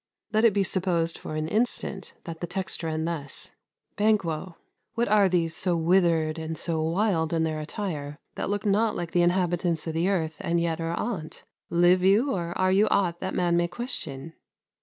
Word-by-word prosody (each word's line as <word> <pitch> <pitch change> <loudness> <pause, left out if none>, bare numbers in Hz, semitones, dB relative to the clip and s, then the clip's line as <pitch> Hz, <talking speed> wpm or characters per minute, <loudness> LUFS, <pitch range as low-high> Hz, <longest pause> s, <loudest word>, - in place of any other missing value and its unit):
Let 220 +2 +4
it 225 - +5
be 200 - +3
supposed, 175 -3 0
for 155 - -6
an 155 0 -2
instant, 210 -1 -2
that 165 -1 -8
the 175 - -2
text 190 +1 -3
ran 160 -1 -2
thus 155 -5 -5 0.5
Banquo.... 185 -5 0 0.4
What 235 +1 +1
are 205 -2 +4
these 170 -2 0
So 180 0 0
withered 165 -2 +2
and 160 0 -4
so 165 -2 -1
wild 165 -1 +1
in 165 -1 +2
their 155 -1 -1
attire, 150 -3 -5 0.2
That - - -3
look 205 +1 -2
not 210 +2 +2
like 170 -1 -4
the 175 - +3
inhabitants 175 -2 +1
o' - - -1
th' 165 +3 0
earth, 160 -5 0
And 170 0 0
yet 165 -1 -1
are 165 +1 -1
on't? 185 -9 -4 0.3
Live 175 +2 +4
you, 210 +9 +4
or 175 -2 -3
are 185 0 +2
you 200 +3 +4
ought 175 -4 +1
That 190 - -3
man 175 -1 +2
may 175 0 +2
question? 170 - -4
175 Hz, 190 wpm, -26 LUFS, 160-195 Hz, 0.5 s, it